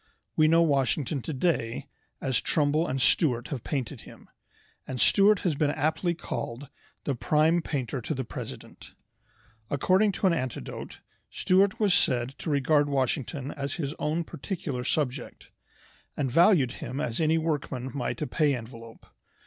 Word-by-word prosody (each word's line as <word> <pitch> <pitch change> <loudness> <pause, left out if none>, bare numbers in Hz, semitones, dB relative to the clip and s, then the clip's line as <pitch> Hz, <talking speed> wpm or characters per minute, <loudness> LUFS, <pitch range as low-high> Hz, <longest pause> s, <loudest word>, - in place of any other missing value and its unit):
We 155 - +5
know 165 +1 +5
Washington 140 -1 +1
today 135 -5 -1 0.3
as 130 -3 0
Trumbull 155 +2 +2
and 135 - -2
Stuart 125 -2 +2
have 130 -6 -4
painted 135 -7 -3
him, - - -15 0.6
and 130 - -4
Stuart 205 - +5
has 175 - +1
been 145 +1 +1
aptly 160 +4 0
called 135 -4 -5 0.3
the 140 - -1
"prime 155 +6 +2
painter 135 -4 -3
to 155 - -3
the 130 - -2
president." - - -9 0.7
According 190 +8 +3
to - - -2
an 185 - +5
anecdote, 130 -7 -5 0.3
Stuart 190 +2 +2
was 205 -4 +3
said 120 -5 +2
to - - -4
regard 145 +1 +2
Washington 140 +1 -1
as 140 -1 -4
his 145 -4 -3
own 160 +3 0
particular 145 -6 -5
subject, 135 -1 -3 0.7
and 135 -3 -1
valued 165 - +5
him 135 - -4
as 120 -1 -2
any 160 +1 +3
workman 145 -5 -2
might 120 -4 -3
a - - 0
"pay 145 +2 +1
envelope." 115 -1 -10
145 Hz, 150 wpm, -27 LUFS, 130-160 Hz, 0.7 s, We